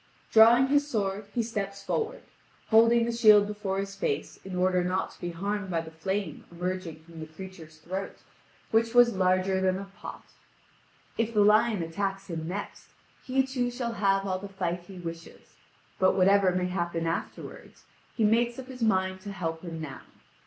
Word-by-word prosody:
Drawing 230 +3 +7
his 290 0 +3
sword 200 -5 -2
he 235 - 0
steps 200 -3 -4
forward, 450 - -2 0.5
holding 230 +1 +5
the 235 - -1
shield 215 -3 +6
before 205 -2 -3
his 195 0 -3
face 195 - -2
in 190 -1 -6
order 180 0 +2
not 185 +1 -1
to - - -19
be 175 - -3
harmed 200 +3 -3
by 170 -2 0
the 160 0 -7
flame 190 +1 -3
emerging 175 -2 -4
from 165 0 -13
the 155 - -6
creature's 160 -1 -11
throat, 185 +5 -6 0.5
which 230 +1 +2
was 245 -1 +7
larger 185 0 +2
than 185 0 +2
a 195 0 -8
pot. - - -8 1.0
If 230 0 0
the 210 - +5
lion 210 -2 +4
attacks 195 +3 -3
him 160 -1 -4
next, 200 +4 -6 0.4
he 265 0 +1
too 255 -2 -1
shall 240 -1 -3
have 195 -2 +1
all 185 -1 -1
the 200 +1 -8
fight 180 -3 -2
he 195 - -10
wishes; 170 -1 -9 0.5
but 185 -1 +4
whatever 195 0 +5
may 180 0 0
happen 170 -2 -2
afterwards 165 0 -5 0.3
he 225 - +2
makes 235 +3 +2
up 260 0 -8
his 255 -1 -9
mind 190 -3 +1
to 205 0 -7
help 165 -4 -4
him 165 -2 -6
now. 145 -4 -7
195 Hz, 180 wpm, -28 LUFS, 180-220 Hz, 1.0 s, Drawing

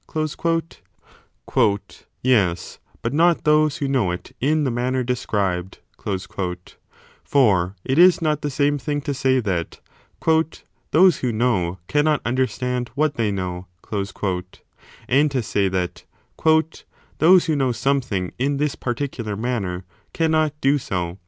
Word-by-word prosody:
l 155 -8 -2 0.4
Yes, 100 -9 +1 0.2
but 115 - -1
not 170 +2 +3
those 150 -1 +3
who 140 - -2
know 130 -9 +1
it 90 0 -6
in 150 +3 +2
the 135 - 0
manner 125 +2 0
described: 100 -7 -2 1.5
for 100 -9 +2
it 130 +4 +1
is 180 0 +7
not 155 -2 0
the 145 - -2
same 145 +1 +1
thing 145 +3 -2
to 145 - -3
say 130 -1 +2
that 95 -8 -3 1.1
those 180 0 +5
who 125 - -1
know 105 -7 0
cannot 150 0 +2
understand 125 0 -1
what 150 0 +1
they 115 -5 0
know, 90 -2 -4 1.4
and 145 +4 +3
to 130 -4 -1
say 100 -1 +1
that 90 -1 -3 1.2
those 180 +3 +6
who 160 -3 +1
know 135 -3 +1
something 115 -6 -1
in 140 +2 +1
this 150 0 0
particu 130 +3 -3
3 115 - -3
lar 105 -1 -3
manner 100 -6 -3 0.3
cannot 155 -2 +1
do 140 +2 +3
so 90 -5 -4
130 Hz, 135 wpm, -22 LUFS, 100-150 Hz, 1.5 s, is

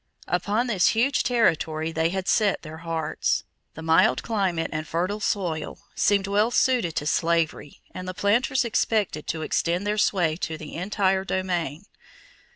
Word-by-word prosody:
Upon 205 +7 0
this 210 -7 +2
huge 265 +5 +3
territory 160 -9 +1
they 160 +1 +1
had 190 +1 -3
set 210 -3 +2
their 155 0 -8
hearts. 165 -1 -1 0.3
The 160 - -8
mild 160 -5 +3
climate 190 -7 -1
and 155 0 -3
fertile 185 +6 -1
soil 175 -7 -2 0.2
seemed 200 -1 +2
well 205 +3 +2
suited 245 -9 +2
to 150 - -1
slavery 165 -2 0
and 185 0 -7
the 185 - -5
planters 240 +6 +2
expected 215 -8 0
to 160 -1 -2
extend 170 +4 0
their 210 +1 0
sway 175 -6 +2
to 160 -3 -4
the 155 -1 -9
entire 190 +1 0
domain. 180 -3 -2
185 Hz, 155 wpm, -25 LUFS, 160-205 Hz, 0.3 s, huge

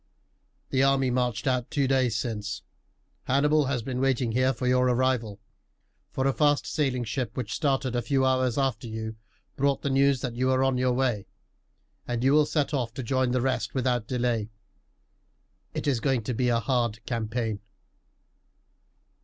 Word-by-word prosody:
"The 130 - +2
army 135 -1 +3
marched 125 -3 -1
out 125 -2 0
two 140 -2 +1
days 130 -4 +2
since. 105 -3 -4 0.6
Hannibal 145 +3 +3
has 130 -4 -1
been 125 +1 -3
waiting 130 -3 +1
here 130 +3 +2
for 125 0 -5
your 125 0 +3
arrival, 125 -4 0 0.7
for 130 - -2
a 135 - +2
fast 145 0 +2
sailing 135 -5 -1
ship 120 0 -4
which 120 -3 -3
started 135 -4 0
a 120 - +1
few 130 +3 +1
hours 130 -2 +1
after 130 -5 -1
you 110 0 -5 0.4
brought 140 0 0
the 140 - 0
news 135 -1 +3
that 125 -3 -3
you 130 +2 0
were 130 0 +3
on 135 -1 +1
your 125 0 +2
way, 120 -6 0 0.8
and 120 0 -2
you 135 - +4
will 150 0 +5
set 150 -1 0
off 120 -5 -2
to 130 - -4
join 130 +1 +1
the 125 0 +1
rest 130 +2 -1
without 125 -4 0
delay. 120 -4 -1 1.3
It - - -3
is 135 -5 +1
going 130 -3 0
to 125 - -2
be 125 +2 +1
a 115 -1 +2
hard 120 -3 -1
campaign." 110 -2 -2
125 Hz, 170 wpm, -27 LUFS, 120-135 Hz, 1.3 s, will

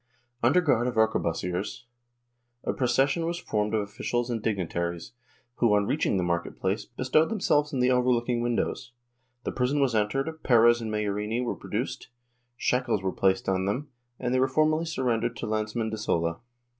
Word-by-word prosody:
Under 130 +10 +4
guard 125 -7 +2
of 125 - -2
arquebusiers 90 -2 0 0.8
a - - -1
proces 130 +2 +2
sion 165 +3 -1
was 170 0 -2
formed 105 -9 -1
of 110 - +2
officials 120 +4 -2
and 115 -2 -2
dignitaries, 85 -5 -2 0.5
who 115 -4 +4
on 105 0 +2
reaching 100 - +1
the 90 - 0
market 85 -1 -2
place 95 +2 -1
bestowed 130 +6 +1
themselves 150 -9 +1
in 130 - -1
the 125 +1 +4
overlooking 125 -1 +2
windows. 120 +1 -2 0.5
The - - -2
prison 130 +3 0
was 135 -4 +2
entered, 135 +9 -1
Perez 120 -1 +5
and 110 -1 -4
Majorini 105 +2 -1
were - - -1
produced, - - -4 0.5
shackles 125 -6 0
were 95 - 0
placed 95 0 +1
on 95 -1 +1
them 125 +9 -2 0.3
and 125 0 -1
they 130 - +3
were 130 - +4
formally 155 +4 +2
surren 125 -8 0
dered - - -1
to - - -5
Lanceman 110 +1 -2
de 110 - -3
Sola. 85 -5 0
120 Hz, 175 wpm, -27 LUFS, 105-130 Hz, 0.8 s, Perez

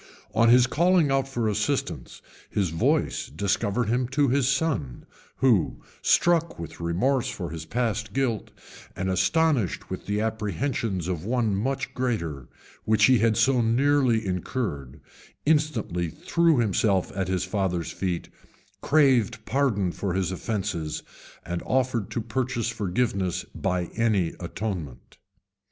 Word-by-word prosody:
On 115 +2 +4
his 125 +1 +7
calling 170 +2 +3
out 135 -1 +1
for 120 -4 -1
assistance, 110 +7 -2 0.3
his 95 -6 0
voice 80 - +1
discovered 100 +3 0
him 120 +2 +1
to 140 +1 +2
his 130 0 +2
son, 135 - -1 0.3
who, 120 - +2 0.2
struck 170 -1 +3
with 85 -2 -8
remorse 120 +11 +1
for 95 -10 -5
his 80 -1 -6
past 115 -1 -2
guilt, 120 -2 -1 0.5
and 95 0 -1
astonished 115 - +1
with - - -6
the 105 +1 0
apprehensions 110 - -2
of 85 -3 -3
one 115 -2 0
much 135 +6 -2
greater, 85 - -2 0.4
which 110 0 +4
he 130 -2 +5
had 115 -1 +2
so 130 -2 +3
nearly 120 -1 +2
incurred, 85 - -3 0.5
instantly 135 - +1
threw 165 - +2
himself 100 -4 +1
at 95 -2 -1
his 95 -1 0
father's 95 -5 -1
feet, 90 -3 -3 0.5
craved 130 -8 +3
pardon 110 -9 +1
for 95 0 -3
his 95 -2 0
offences, 95 -5 -3 0.4
and 85 0 -3
offered 125 -5 0
to 120 - -2
purchase 120 +1 -2
forgiveness 100 -3 -1
by 90 0 -1
any 105 -7 +1
atonement. 90 - -5
110 Hz, 130 wpm, -26 LUFS, 95-130 Hz, 0.5 s, his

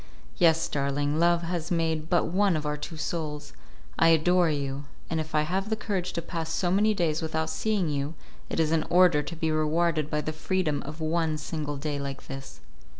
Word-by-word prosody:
"Yes, 165 -1 +4
darling, 145 +2 0
Love 170 0 +3
has 170 -1 -3
made 160 -2 0
but 175 - +3
one 190 0 +2
of 150 - -4
our 150 0 0
two 155 +2 -7
souls. 150 -2 -4 0.5
I - - +6
adore 170 +2 +4
you, 140 -1 -2 0.3
and 160 - +1
if 155 0 -4
I 150 - +4
have 190 +6 -1
the 220 - +1
courage 195 -5 -3
to 170 - -3
pass 165 -2 -4
so 175 +2 0
many 210 +3 +3
days 165 -4 0
without 160 0 -1
seeing 210 -5 0
you 145 +1 -2 0.3
it - - -2
is 160 -1 +2
in 165 -1 +3
order 175 -4 +5
to 170 - -6
be 160 -1 -1
rewarded 155 0 +1
by 150 -1 0
the 155 - -3
freedom 155 -2 0
of 155 +2 -7
one 160 0 0
single 150 -1 -4
day 145 0 -3
like 140 -1 -5
this." 135 0 -8
160 Hz, 205 wpm, -27 LUFS, 150-175 Hz, 0.5 s, I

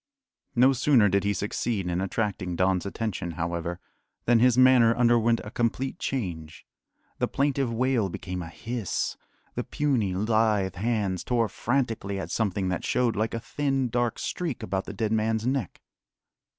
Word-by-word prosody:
No 130 +3 +5
sooner 125 -5 +4
did 100 +1 +2
he 100 - +2
succeed 100 0 -2
in 90 +1 -1
attracting 95 -2 -2
Don's 95 +1 +1
attention, 100 -5 -3
however, 85 +1 -3 0.5
than 120 -1 +4
his 125 0 +4
manner 130 -3 +6
underwent 120 -1 +3
a 105 - -8
complete 125 +5 -1
change. 85 -11 -4 0.5
The - - +1
plaintive 140 -3 0
wail 120 -3 +1
became 90 +1 -5
a 85 - -7
hiss, 115 +1 -3 0.4
the - - -2
puny, 125 -11 0
lithe 105 -2 +2
hands 100 -3 -1
tore 115 -3 +1
frantically 115 -6 -1
at 85 -2 -5
something 100 -4 0
that 90 - -2
showed 120 -3 +1
like 110 +2 -1
a - - -2
thin, 135 0 -1
dark 120 0 0
streak 165 -8 -3
about 95 +1 -2
the - - -7
dead 110 -2 -1
man's 110 0 +1
neck. 130 - -2
110 Hz, 155 wpm, -27 LUFS, 95-120 Hz, 0.5 s, manner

